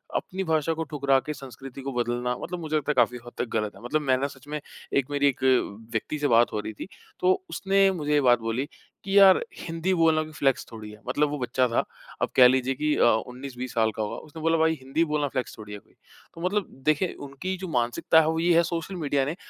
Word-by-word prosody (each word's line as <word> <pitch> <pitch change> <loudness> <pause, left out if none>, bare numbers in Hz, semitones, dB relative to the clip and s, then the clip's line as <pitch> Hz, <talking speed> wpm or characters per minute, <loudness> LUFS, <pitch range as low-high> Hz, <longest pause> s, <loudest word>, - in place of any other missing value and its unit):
अपनी 190 +1 -2
भाषा 160 -2 +1
को 160 0 -3
ठुकरा 140 -2 +3
के 150 - -3
संस्कृति 135 -1 -10
को 135 0 -5
बदलना 120 0 -1
मतलब 180 0 -5
मुझे 155 -2 -3
लगता 150 0 -1
है - - 0
काफ़ी 125 -1 +3
हद 120 - -10
तक - - -1
गलत 105 -1 -2
है। - - -14
मतलब 155 +6 0
मैं 130 -3 +2
ना 135 +2 -1
सच 135 -1 -14
में 150 +1 -3 0.3
एक 140 0 +1
मेरी 145 0 +2
एक 135 -1 -1 0.5
व्यक्ति 120 +6 -3
से 145 - +1
बात 120 -2 +4
हो 105 - -1
रही 110 - -5
थी 105 - -8 0.3
तो 185 +1 +4 0.2
उसने 195 +3 +3
मुझे 150 -5 -2
ये 145 - +4
बात 120 -2 +5
बोली 115 +4 -2 0.4
कि 195 +1 +1
यार 195 -1 +8 0.2
हिंदी 165 +2 -2
बोलना 165 -2 +3
कोई 155 - -10
फ़्लेक्स 135 -3 +1
थोड़ी 110 -2 -8
है, 105 - -13
मतलब 145 +4 +1
वो 150 - -3
बच्चा 125 +1 +1
था। 115 - +1 0.4
अब - - +1
कह 125 -1 +9
लीजिए 130 +1 +1
कि 150 +2 0
अ, - - +2
19-20 125 +2 -1
साल 110 -2 +2
का 110 - -3
होगा, 105 - -4
उसने 155 +1 -10
बोला 165 +1 +2
भाई 160 0 +3
हिंदी 135 +5 0
बोलना 150 -1 +1
फ़्लेक्स 130 -2 -4
थोड़ी 105 -1 -9
है 105 - -7
कोई। - - -29 0.4
तो 165 - -10
मतलब 190 +2 0 0.2
देखें 155 +4 +2
उनकी 160 +8 -4
जो 185 +1 -6
मानसिकता 120 +2 +2
है 155 - 0
वो 160 0 0
ये 170 +1 +3
है 170 - +5
सोशल 170 +2 -4
मीडिया 145 -5 0
ने, 150 +4 -3
145 Hz, 245 wpm, -26 LUFS, 125-160 Hz, 0.5 s, कह